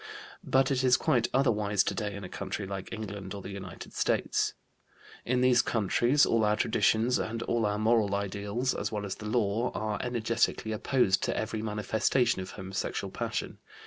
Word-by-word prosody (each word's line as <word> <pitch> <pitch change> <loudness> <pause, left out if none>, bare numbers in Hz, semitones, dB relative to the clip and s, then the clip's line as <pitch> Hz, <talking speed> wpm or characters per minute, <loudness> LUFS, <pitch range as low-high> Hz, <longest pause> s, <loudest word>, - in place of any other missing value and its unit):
But 135 +1 +2
it 130 -1 +1
is 130 0 +5
quite 120 -1 +2
otherwise 105 -6 +2
today 105 -1 -2
in 100 - -7
a - - -5
country 100 +2 -5
like 95 -1 -6
England 100 -3 -6
or 100 - -6
the 100 - -7
United 95 -3 -8
States. - - 0 0.7
In 125 +1 +1
these 125 -1 +5
countries 120 +6 +2
all 115 -1 +2
our 105 0 +3
traditions 115 +3 +2
and 115 +1 -3
all 115 -2 +1
our 105 0 -1
moral 110 -2 +2
ideals, 100 +5 -2
as 105 - -3
well 105 -1 -3
as 95 - -3
the 105 - -7
law, 115 +1 +1
are 105 -1 -2
energetically 115 -2 0
opposed 110 -2 +2
to - - -1
every 110 0 -2
manifestation 110 +1 +1
of 95 - -7
homosexual 95 -1 -4
passion. - - -4
110 Hz, 175 wpm, -29 LUFS, 100-120 Hz, 0.7 s, is